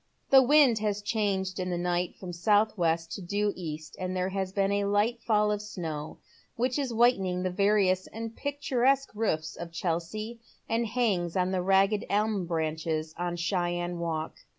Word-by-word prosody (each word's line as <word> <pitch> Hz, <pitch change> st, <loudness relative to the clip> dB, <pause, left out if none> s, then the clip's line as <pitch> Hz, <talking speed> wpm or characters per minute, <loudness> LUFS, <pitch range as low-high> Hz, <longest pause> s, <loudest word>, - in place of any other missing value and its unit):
The 270 Hz, -1 st, +9 dB
wind 265 Hz, -4 st, +5 dB
has 210 Hz, -1 st, -1 dB
changed 200 Hz, -3 st, -1 dB
in 185 Hz, 0 st, -2 dB
th© 175 Hz, -1 st, -1 dB
night 175 Hz, 0 st, -1 dB
from 180 Hz, -2 st, -8 dB
south 210 Hz, +5 st, +2 dB
west 165 Hz, -2 st, 0 dB
to -, -, -5 dB
due 205 Hz, +3 st, 0 dB
east, 155 Hz, -3 st, -7 dB
and 185 Hz, 0 st, -3 dB
there 185 Hz, +1 st, 0 dB
has 190 Hz, -1 st, -2 dB
been 195 Hz, 0 st, +1 dB
a 200 Hz, 0 st, +1 dB
light 210 Hz, +4 st, +1 dB
fall 210 Hz, -2 st, +2 dB
of 210 Hz, -1 st, -1 dB
snow, 160 Hz, -7 st, -5 dB, 0.4 s
which 250 Hz, +3 st, 0 dB
is 270 Hz, -3 st, -1 dB
whitening 195 Hz, -6 st, +2 dB
the 185 Hz, -, -1 dB
various 195 Hz, -1 st, +2 dB
and 225 Hz, 0 st, -7 dB
picturesque 275 Hz, -1 st, +1 dB
roofs 160 Hz, -8 st, -1 dB
of 170 Hz, -1 st, -7 dB
Chelsea, 180 Hz, +8 st, -3 dB, 0.3 s
and 230 Hz, +1 st, 0 dB
hangs 205 Hz, -7 st, 0 dB
on 185 Hz, 0 st, +1 dB
the 185 Hz, -1 st, 0 dB
ragged 195 Hz, +3 st, +3 dB
elm 205 Hz, -3 st, 0 dB
branches 160 Hz, -1 st, -2 dB
on 175 Hz, 0 st, -2 dB
Cheyne 175 Hz, 0 st, -1 dB
Walk. 160 Hz, -1 st, -3 dB
195 Hz, 175 wpm, -28 LUFS, 175-215 Hz, 0.4 s, The